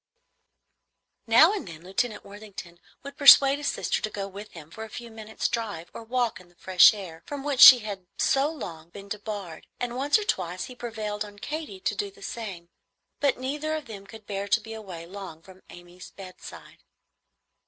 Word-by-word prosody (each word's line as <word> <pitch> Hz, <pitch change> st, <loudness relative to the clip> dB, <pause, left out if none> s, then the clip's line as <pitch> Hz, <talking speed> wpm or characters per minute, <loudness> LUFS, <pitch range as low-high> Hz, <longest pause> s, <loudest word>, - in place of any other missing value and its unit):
Now 245 Hz, -, +6 dB
and 410 Hz, -, -5 dB
then 165 Hz, -1 st, -10 dB
Lieutenant 210 Hz, +5 st, -3 dB
Worthington 200 Hz, -4 st, -11 dB, 0.2 s
would 280 Hz, +1 st, -9 dB
persuade 280 Hz, 0 st, +8 dB
his 290 Hz, -, -3 dB
sister -, -, -1 dB
to 215 Hz, -, -2 dB
go 200 Hz, -2 st, -5 dB
with 200 Hz, +2 st, -10 dB
him 160 Hz, -2 st, -12 dB
for 220 Hz, -, -8 dB
a 220 Hz, -, -9 dB
few 235 Hz, +1 st, -9 dB
minutes' 220 Hz, 0 st, -4 dB
drive 210 Hz, -8 st, -4 dB
or -, -, -8 dB
walk 240 Hz, -1 st, -1 dB
in 180 Hz, -, -20 dB
the 175 Hz, -, -27 dB
fresh 185 Hz, 0 st, +6 dB
air, 180 Hz, -6 st, -9 dB
from 285 Hz, -2 st, -6 dB
which 285 Hz, -3 st, -2 dB
she 260 Hz, -, +12 dB
had 195 Hz, -4 st, -7 dB
so 275 Hz, +2 st, +2 dB
long 170 Hz, -, -8 dB
been 200 Hz, +3 st, -12 dB
debarred, 205 Hz, -5 st, -6 dB
and 245 Hz, 0 st, -3 dB
once 280 Hz, -, +2 dB
or 425 Hz, -, -3 dB
twice 180 Hz, -, -2 dB
he 255 Hz, -, -8 dB
prevailed 215 Hz, -3 st, -4 dB
on 205 Hz, -1 st, -12 dB
Katy 290 Hz, -4 st, -6 dB
to -, -, -1 dB
do 205 Hz, 0 st, -3 dB
the 195 Hz, -, -16 dB
same; 195 Hz, -7 st, -7 dB, 0.5 s
but 280 Hz, -3 st, +1 dB
neither 295 Hz, +5 st, -3 dB
of 310 Hz, -2 st, -5 dB
them 200 Hz, -3 st, -10 dB
could 220 Hz, 0 st, -13 dB
bear 200 Hz, -1 st, -4 dB
to 205 Hz, -, +3 dB
be 225 Hz, 0 st, -9 dB
away 190 Hz, -7 st, -8 dB
long 180 Hz, -3 st, -10 dB
from 190 Hz, +1 st, -16 dB
Amy's 175 Hz, +1 st, -13 dB
bedside. 185 Hz, -2 st, -12 dB
210 Hz, 195 wpm, -26 LUFS, 185-245 Hz, 0.5 s, she